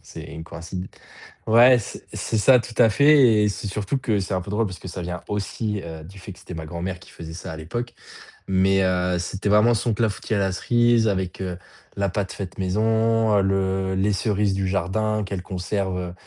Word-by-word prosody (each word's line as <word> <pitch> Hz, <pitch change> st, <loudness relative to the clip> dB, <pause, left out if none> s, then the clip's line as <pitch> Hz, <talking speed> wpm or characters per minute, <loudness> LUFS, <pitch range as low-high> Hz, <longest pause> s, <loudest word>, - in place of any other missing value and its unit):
c'est -, -, -10 dB
une 80 Hz, -, -8 dB
coïncid 85 Hz, +3 st, -7 dB, 0.6 s
ouais 120 Hz, +3 st, +7 dB
c'est 110 Hz, -, -8 dB
c'est 110 Hz, -, -2 dB
ça 125 Hz, +4 st, +6 dB
tout 115 Hz, 0 st, -7 dB
à 115 Hz, -2 st, +6 dB
fait 135 Hz, -5 st, +5 dB
et 105 Hz, -, +3 dB
c'est 105 Hz, -, -5 dB
surtout 105 Hz, +5 st, -2 dB
que 110 Hz, -6 st, 0 dB
c'est 95 Hz, +1 st, -3 dB
un 90 Hz, -, -1 dB
peu 100 Hz, -, -8 dB
drôle 110 Hz, +1 st, +1 dB
parce 95 Hz, -2 st, -8 dB
que -, -, -9 dB
ça 90 Hz, +1 st, -6 dB
vient 90 Hz, 0 st, -5 dB
aussi, 105 Hz, +1 st, -3 dB
heu, 80 Hz, -2 st, -8 dB
du 95 Hz, +4 st, -12 dB
fait 100 Hz, -, -9 dB
que -, -, -18 dB
c'était 90 Hz, -, -10 dB
ma 80 Hz, -1 st, -6 dB
grand-mère 90 Hz, +2 st, -4 dB
qui -, -, -16 dB
faisait 80 Hz, -1 st, -9 dB
ça 85 Hz, 0 st, -7 dB
à 80 Hz, -, -7 dB
l'époque 120 Hz, +10 st, -5 dB, 0.5 s
mais 95 Hz, +1 st, +3 dB
heu, 90 Hz, -1 st, +1 dB
c'était 95 Hz, +3 st, -3 dB
vraiment 105 Hz, +3 st, +5 dB
son 115 Hz, +1 st, 0 dB
clafoutis 110 Hz, 0 st, -1 dB
à -, -, +1 dB
la 95 Hz, -1 st, +1 dB
cerise 120 Hz, +3 st, +2 dB
avec, 95 Hz, -3 st, -2 dB
heu, 90 Hz, -2 st, -4 dB, 0.4 s
la 100 Hz, 0 st, +1 dB
pâte 100 Hz, +1 st, -3 dB
faite 95 Hz, -2 st, -7 dB
maison, 110 Hz, +3 st, +2 dB
heu, -, -, +4 dB
le 95 Hz, 0 st, 0 dB
les 95 Hz, +2 st, +1 dB
cerises 100 Hz, 0 st, 0 dB
du 95 Hz, 0 st, -1 dB
jardin 105 Hz, +3 st, 0 dB
qu'elle 95 Hz, -2 st, -5 dB
conserve, 95 Hz, 0 st, -3 dB
heu, 90 Hz, -1 st, -4 dB
100 Hz, 220 wpm, -23 LUFS, 90-110 Hz, 0.6 s, ouais